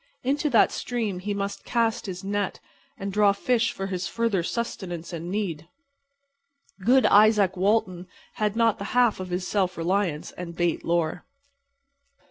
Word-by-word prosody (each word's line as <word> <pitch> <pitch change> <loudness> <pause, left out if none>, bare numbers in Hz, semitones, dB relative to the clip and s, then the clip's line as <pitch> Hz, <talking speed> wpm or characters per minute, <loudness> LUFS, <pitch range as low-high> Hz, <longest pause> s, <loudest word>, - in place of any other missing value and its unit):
Into 290 +4 0
that - - +4
stream 220 -7 -3
he 205 +3 -4
must 200 0 -3
cast 230 -1 0
his 185 -1 -6
net 200 0 -2 0.4
and 195 0 -5
draw 205 -1 +4
fish 230 +2 +1
for 195 - -5
his 185 -2 -3
further 230 -5 0
sustenance 180 -4 -4
and 170 +1 -5
need. 175 -6 -3 1.1
Good 260 +5 +5
Izaak 205 -2 +5
Walton 185 -2 0 0.3
had 210 -1 0
not 230 -2 +2
the 200 - -4
half 240 -5 +4
of 185 -1 -5
his 180 +1 -2
self 185 -3 0
reliance 170 -2 -1
and 170 -1 -8
bait 175 -1 0
lore. 170 0 0
200 Hz, 150 wpm, -25 LUFS, 180-220 Hz, 1.1 s, Good